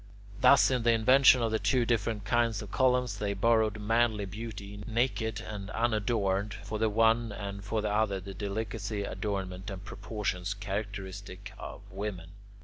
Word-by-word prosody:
Thus 130 +1 +6
in 125 -2 +1
the 115 0 +4
invention 130 +2 +6
of 115 - 0
the 110 - +1
two 125 -3 +2
different 110 -2 0
kinds 115 -3 +1
of 105 - -10
columns, 125 -4 +2
they 100 -1 -1
borrowed 110 +1 +2
manly 110 -1 +1
beauty, 100 -1 -7
naked 110 -2 0
and 100 -2 -7
unadorned, 105 -3 0
for 105 +1 -4
the 110 0 +2
one, 115 +1 +3
and 100 -1 -6
for 105 +1 -2
the 105 -1 0
other 105 -2 +1
the 95 +1 -8
delicacy, 100 +1 -3
adornment, 95 -2 -4
and 95 0 -7
proportions 100 -2 -3
characteristic 100 -1 -6
of - - -8
women. 95 -4 -5
105 Hz, 155 wpm, -30 LUFS, 100-115 Hz, -, Thus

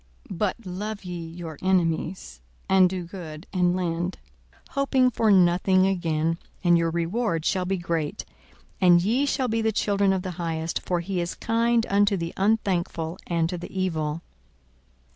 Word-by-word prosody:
42:006:035 185 - -5
But 210 +2 -1
love 200 +3 -5
ye 175 -2 -5
your 165 -2 -8
enemies, 170 - 0 0.3
and 190 -1 +5
do 185 -1 -4
good, 170 -2 -9
and 180 -1 +2
lend, 175 0 -2 0.5
hoping 265 -2 +2
for 225 -1 +1
nothing 185 0 +4
again; 165 -3 0 0.2
and 175 -1 +5
your 165 0 +2
reward 170 +1 -1
shall 185 -1 +1
be 190 +1 0
great, 165 -4 -3 0.6
and 175 -2 +6
ye 245 +8 +2
shall 265 -2 0
be 225 -1 0
the 220 0 +1
children 200 -2 +2
of 190 -1 0
the 185 - -4
Highest: 165 -1 -2
for 175 -1 -1
he 180 0 -2
is 170 - -3
kind 230 0 +1
unto 200 0 +3
the 170 -1 -4
unthankful 185 -5 0
and 165 -2 +1
to 180 -1 -4
the - - -7
evil. 160 -3 -1
180 Hz, 160 wpm, -25 LUFS, 170-200 Hz, 0.6 s, and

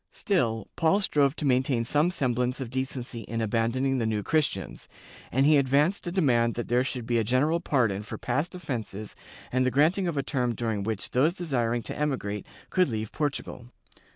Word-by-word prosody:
Still, 115 - 0
Paul 165 +5 +3
strove 145 -7 +2
to 150 - -4
maintain 130 -2 +2
some 150 +7 +2
semblance 125 -6 0
of 125 -3 -5
decency 130 -2 -3
in 115 +1 -4
abandoning 115 +4 0
the 115 - 0
New 105 -2 -1
Christians, 140 - -1 0.4
and 135 +3 +3
he 150 0 +6
advanced 145 +8 +2
a - - -1
demand 120 -10 +2
that 120 - -4
there 125 +1 +3
should 125 -3 -4
be 120 -1 +1
a - - +1
general 135 +9 +2
pardon 120 - +1
for 105 - -6
past 145 +9 -2
offences 115 - -5 0.4
and 130 +1 +2
the 130 - +3
granting 160 +8 +2
of 165 -4 -2
a 140 - +1
term 125 -4 -1
during 110 -3 -2
which 105 0 -3
those 150 +8 +2
desiring 120 -9 -1
to - - -6
emigrate 125 -9 -2 0.2
could 185 -4 +3
leave 110 -2 -3
Portugal. 140 -4 -3
130 Hz, 185 wpm, -27 LUFS, 115-150 Hz, 0.4 s, he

